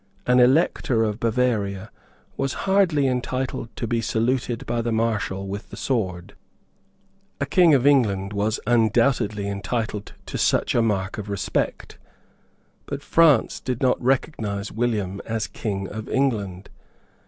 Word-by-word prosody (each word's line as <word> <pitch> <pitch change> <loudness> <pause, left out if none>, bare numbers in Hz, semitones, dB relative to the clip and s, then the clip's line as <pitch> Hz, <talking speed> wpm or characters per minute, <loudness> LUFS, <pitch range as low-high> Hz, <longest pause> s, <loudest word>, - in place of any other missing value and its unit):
An 125 0 +4
Elector 125 -3 +3
of 105 0 -2
Bavaria 110 -4 0 0.4
was 135 - -1
hardly 190 -7 +3
entitled 130 -1 -2
to - - -3
be 115 0 0
saluted 120 +1 -1
by 120 -1 -1
the 120 0 -2
Marshal 110 -4 -1
with 100 +2 -6
the - - -9
sword. 95 -7 -2 1.1
A 140 - 0
King 165 +1 +5
of 130 -1 +1
England 105 -9 +3
was 105 +2 0
undoubtedly 115 -2 +2
entitled 105 +1 -3
to - - -5
such - - +2
a 120 - +3
mark 100 -3 -1
of 105 0 -6
respect; 100 -2 -2 0.9
but 140 0 -5
France 160 -8 +4
did 125 -3 -3
not 130 -2 +2
recognise 115 -6 -1
William 105 -4 -1
as 110 -1 -2
King 95 -3 -4
of 110 +4 -7
England. 105 -9 -1
115 Hz, 135 wpm, -23 LUFS, 100-130 Hz, 1.1 s, King